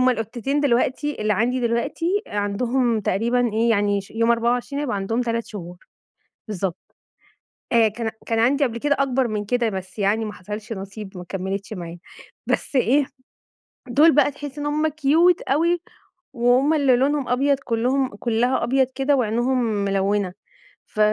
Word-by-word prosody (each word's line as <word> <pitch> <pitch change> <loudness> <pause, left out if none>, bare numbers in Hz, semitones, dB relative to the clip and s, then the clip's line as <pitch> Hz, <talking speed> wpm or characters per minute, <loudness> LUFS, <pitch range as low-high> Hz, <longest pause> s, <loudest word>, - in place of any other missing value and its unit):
هم 255 - +4
القطتين 240 +5 -2
دلوقتي 275 +1 0
اللي 215 0 +2
عندي 245 +5 0
دلوقتي، 330 - 0
آآ، 205 - -4
عندهم 235 +3 0
تقريبًا 235 +4 0
إيه 230 +1 +2
يعني 205 -2 +2
ش 195 - -14
يوم 230 +1 +1
24 245 +4 0
هيبقى 250 -8 -2
عندهم 225 +5 -1
3 230 -1 -2
شهور، 180 -4 -8 0.7
بالضبط. 190 -3 -3 1.0
آآ، 230 -1 +5
كان 225 +1 -3
كان 225 -1 0
عندي 275 +5 +3
قبل 235 -3 -1
كده 285 +3 +1
أكبر 265 -2 +1
من 210 -1 -3
كده، 240 +1 +1
بس 190 +1 -7
يعني 210 +3 +1
ما 210 - -5
حصلش 210 +4 -7
نصيب 195 0 -8
ما 180 - -8
كمّلِتش 195 +2 -4
معايا، 175 -2 -7 0.5
بس - - -1
إيه، 265 +2 +3 0.8
دول 300 +6 +5
بقى 290 0 +4
تحسّي 290 0 -8
إن - - -3
هم 305 +1 +1
كيوت 315 +4 +3
أوي 335 +5 +1 0.5
وهم 250 +5 +3
اللي 275 -5 +4
لونهم 275 +1 +1
أبيض 275 +3 +2
كلّهم 250 -1 0
كلّها 240 +3 0
أبيض 265 +2 +2
كده، 275 +1 +2
وعينيهم 240 +2 +1
ملوّنة، 200 -3 0 0.5
ف - - -10
235 Hz, 160 wpm, -22 LUFS, 210-270 Hz, 1.0 s, آآ